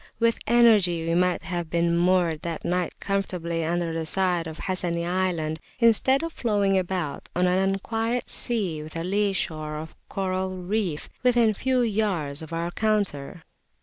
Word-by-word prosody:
With 230 0 +2
energy 210 -8 +4
we 165 - +1
might 180 +1 +2
have 175 -2 -3
been 170 0 +1
moored 175 -2 +2
that 165 -2 -5
night 180 0 -1
comfortably 180 -4 -2
under 170 0 -1
the 165 0 -2
side 180 -2 +1
of 160 0 -8
Hassani 175 -2 -1
Island, 175 -3 -1 0.2
instead 255 +4 +4
of 330 -1 -4
floating 205 -4 +1
about 180 -5 -2
on 180 - +2
an 180 +1 +3
unquiet 225 +5 -1
sea 195 -10 -1
with 155 +1 -10
a 165 - -2
lee 200 +3 +1
shore 155 -5 -3
of 155 +1 -8
coral 185 -1 -2
reef 180 -3 -2
within 240 -3 +4
a - - -3
few 255 +4 +1
yards 195 -11 0
of 160 - -9
our 170 +1 -2
counter. 190 -8 -1
180 Hz, 165 wpm, -25 LUFS, 165-205 Hz, 0.2 s, energy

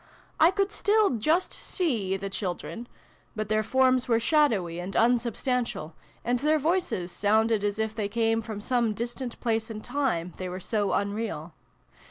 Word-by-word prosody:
I 325 - +7
could 395 +2 0
still 425 -2 +3
just 310 - +1
see 225 - -1
the 195 +1 -5
children: 195 +4 -4 0.5
but 215 -1 -3
their 215 0 +2
forms 255 +2 +3
were 230 -2 +3
shadowy 225 - +2
and 185 +3 -5
unsubstantial, 240 - 0 0.3
and 245 +1 +1
their 305 +4 +3
voices 310 - 0
sounded 215 +2 +2
as 205 0 0
if 220 0 -1
they 210 -2 -2
came 225 +1 +1
from 215 -2 -6
some 235 -2 +1
distant 240 +2 -5
place 225 -1 0
and 215 -1 -7
time, 205 - -1
they 185 -1 -4
were 180 +1 -5
so 205 +1 0
unreal. 200 -5 -2
225 Hz, 160 wpm, -27 LUFS, 200-255 Hz, 0.5 s, I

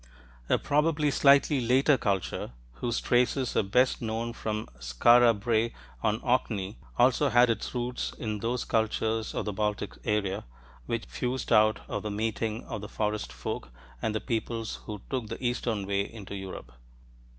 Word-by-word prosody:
A - - +4
probably 150 0 +2
slightly 140 0 +5
later 130 +5 +4
culture, 95 - -2 0.2
whose 120 - -1
traces 125 +1 +1
are - - +4
best 125 +6 +2
known 115 +1 -2
from 110 -2 -3
Skara 115 - +5
Brae 115 +1 +1 0.3
on 110 0 +1
Orkney, 110 -5 0 0.2
also 130 +4 +4
had 120 -1 +5
its 115 +3 -4
roots 125 0 -2
in 110 -2 -3
those 120 +3 -1
cultures 110 0 0
of - - -2
the 105 - -2
Baltic 105 0 -2
area 105 -3 -1 0.4
which 115 -1 -2
fused 125 0 -2
out 110 0 +5
of - - -3
the 105 - -4
meeting 110 +1 -2
of 105 - -6
the 105 - -7
"Forest 105 0 -2
folk" - - -5 0.3
and 110 - -1
the - - +1
peoples 115 -1 -3
who 105 -2 -6
took 125 -5 -3
the 125 - -6
eastern 120 -4 -1
way 100 0 +1
into 105 -4 -9
Europe. 95 -11 -7
115 Hz, 160 wpm, -28 LUFS, 105-125 Hz, 0.4 s, slightly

